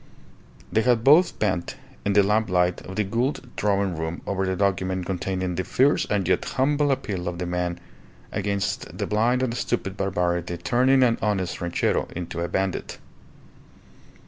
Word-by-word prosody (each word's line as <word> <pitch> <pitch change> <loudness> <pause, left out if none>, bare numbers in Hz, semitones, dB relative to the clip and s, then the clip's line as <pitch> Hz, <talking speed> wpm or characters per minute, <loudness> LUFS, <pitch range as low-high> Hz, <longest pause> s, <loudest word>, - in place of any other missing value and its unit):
They 110 - +3
had 120 -1 +2
both 160 +7 +5
bent 95 -5 -1 0.3
in 100 - +1
the 100 0 +6
lamplight 95 -4 +1
of 95 - -7
the 105 - +1
Gould 120 +5 -2
drawing 100 -3 +1
room 80 +1 -4
over 95 -1 -1
the 95 - 0
document 95 -1 0
containing 95 0 -2
the 90 +2 -2
fierce 135 +9 +2
and 100 -4 0
yet 95 - +2
humble 145 +2 +1
appeal 100 -9 -2
of 90 0 -3
the 90 - -3
man 90 0 -2 0.5
against 100 -1 -2
the - - -1
blind 120 +4 +1
and 120 -3 0
stupid 95 -5 -2
barbarity 90 -3 -1
turning 130 +8 +3
an 120 -2 +2
honest 95 -4 -1
ranchero 85 -1 0
into 85 -1 -4
a 85 - -1
bandit. 95 +1 -2
95 Hz, 160 wpm, -24 LUFS, 90-115 Hz, 0.5 s, the